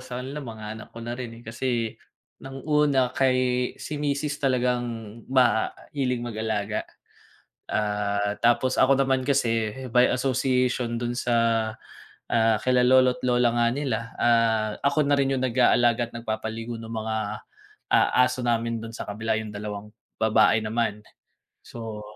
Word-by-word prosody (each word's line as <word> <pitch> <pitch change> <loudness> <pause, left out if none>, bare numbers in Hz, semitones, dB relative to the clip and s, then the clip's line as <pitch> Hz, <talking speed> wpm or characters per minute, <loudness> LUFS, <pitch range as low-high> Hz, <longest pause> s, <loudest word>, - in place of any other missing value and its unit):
sa 125 -1 -6
kanila 135 +3 -6
mga 110 -3 -8
anak 110 - -10
ko - - -11
na 120 +1 -4
rin, 125 -2 -6
eh, 120 - -14
kasi 115 -1 -2 0.5
ng 135 +1 -9
una 145 -4 +2
kay 130 -1 +3 0.4
si 150 - -6
misis 145 0 -1
talagang 125 -2 +1 0.5
mahilig 125 +1 +1
mag-alaga. 110 -2 -2 0.9
Ah, 105 -1 -1
tapos 120 +2 +2
ako 135 +1 +5
naman 130 -1 0
kasi 115 -6 +1 0.2
may 125 0 +5
association 125 -2 0
dun 120 0 -2
sa, 120 -1 0 1.0
ah, 115 -1 +3
kila 125 -1 +3
lolo't 130 0 +4
lola 125 -1 +3
nga 120 0 +2
nila, 135 -6 -1 0.2
ah, 115 -2 +3
ako 140 +2 +2
na 140 0 +2
rin 135 -1 +2
'yung 130 - -1
nag-aalaga 120 -1 +3
at - - -32
nagpapaligo 115 0 -4
nung 115 0 -7
mga, 110 0 -2 0.8
ah, - - +4
aso 125 0 -2
namin 115 -1 0
dun 115 0 -8
sa - - -5
kabila, 110 +2 -1
'yung 110 -1 -5
2 105 0 -6 0.3
babae 110 0 +4
naman. 110 -1 -1 0.6
So 110 -2 -8
120 Hz, 145 wpm, -25 LUFS, 110-130 Hz, 1.0 s, ako